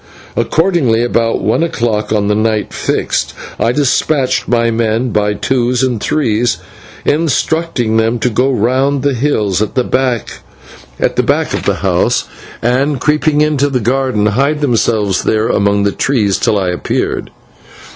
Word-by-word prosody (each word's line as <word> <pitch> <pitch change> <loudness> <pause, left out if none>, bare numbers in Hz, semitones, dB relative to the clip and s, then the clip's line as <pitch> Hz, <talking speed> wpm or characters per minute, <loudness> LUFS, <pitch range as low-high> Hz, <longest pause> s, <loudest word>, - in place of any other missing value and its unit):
Accordingly, 155 -10 +1
about 115 -1 0
one - - +1
o'clock 115 -10 -1
on 105 -2 +1
the 105 - +2
night 110 0 0
fixed, - - -1 0.2
I 115 - +2
despatched 135 0 +1
my 115 -1 +2
men 115 +2 0
by 105 0 0
twos 125 +4 0
and 125 -5 -1
threes, 120 -5 0 0.5
instructing 155 -6 0
them 115 +2 +1
to 120 +2 -1
go 125 +5 +1
round 130 +3 +1
the 140 -1 +1
hills 110 -7 0
at 110 - -2
the 130 - +2
back 130 -4 -1 0.6
of - - 0
the - - +1
house, - - +1 0.4
and, 130 +4 +1
creeping 150 +2 +1
into 145 -2 +2
the 130 -2 0
garden, 125 -2 0
to 105 - +2
hide 140 +7 0
themselves 110 -6 +1
there 110 +1 0
among 100 -1 +2
the 100 - +1
trees 105 -8 0
till 105 - +1
I 95 -2 0
appeared. 90 - -2
120 Hz, 145 wpm, -14 LUFS, 110-135 Hz, 0.6 s, the